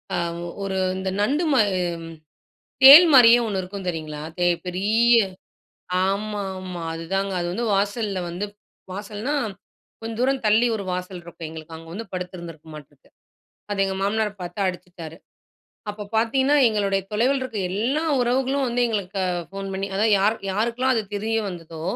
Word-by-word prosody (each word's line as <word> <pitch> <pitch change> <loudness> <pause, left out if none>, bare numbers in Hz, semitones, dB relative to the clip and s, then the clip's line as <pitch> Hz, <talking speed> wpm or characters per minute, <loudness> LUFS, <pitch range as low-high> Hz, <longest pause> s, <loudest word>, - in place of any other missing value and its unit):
அ - - 0 0.5
ஒரு 195 -1 -3 0.2
இந்த 190 0 -3
நண்டு 290 +10 +1
மா 260 - +4 1.2
தேள் 295 +6 +12
மாரியே 240 -2 +8
ஒண்ணு 195 -3 -1
இருக்கும் 190 +1 -7
தெரியுங்களா? 155 -3 -5 0.2
தே 175 0 +2 0.2
பெரிய 220 +6 +3 0.9
ஆமா, 205 +2 -2 0.2
ஆமா. 180 -2 -6
அதுதாங்க 195 +4 -2
அது 175 - -2
வந்து 235 +5 -2
வாசல்ல 205 0 -1
வந்து 180 +4 -4 0.5
வாசல்ன்னா 210 +7 -4 0.7
கொஞ்சம் 225 0 -6
தூரம் 265 +1 +1
தள்ளி 220 +3 +4
ஒரு 200 - -6
வாசல் 180 0 -5
இருக்கும் 165 -2 -8
எங்களுக்கு. 160 0 -10
அங்க 165 0 -13
வந்து 225 +4 -6
படுத்துருந்துருக்கும் 170 -4 -7
மாட்டிருக்கு. 145 -2 -14 0.6
அது 195 -1 +1
எங்க 190 0 -3
மாமனார் 210 +1 0
பார்த்து 175 +3 -5
அடிச்சுட்டாரு. 175 -3 -7 0.7
அப்ப 205 0 -8
பார்த்தீங்கன்னா, 265 +6 +2
எங்களுடைய 200 -2 0
தொலைவில 260 +5 +2
இருக்க 240 -4 -6
எல்லா 245 - 0 0.2
உறவுகளும் 265 +2 +1
வந்து 240 +1 -1
எங்களுக்கு 200 -3 -3 0.3
ஃபோன் 195 0 -6
பண்ணி 195 +1 -2
அதாவது 215 +2 +2
யாரு 210 +3 +2 0.2
யாருக்கெல்லாம் 235 +5 0
அது 220 - +1
தெரிய 225 +2 -1
வந்ததோ 165 -3 -8
200 Hz, 145 wpm, -23 LUFS, 180-230 Hz, 1.2 s, தேள்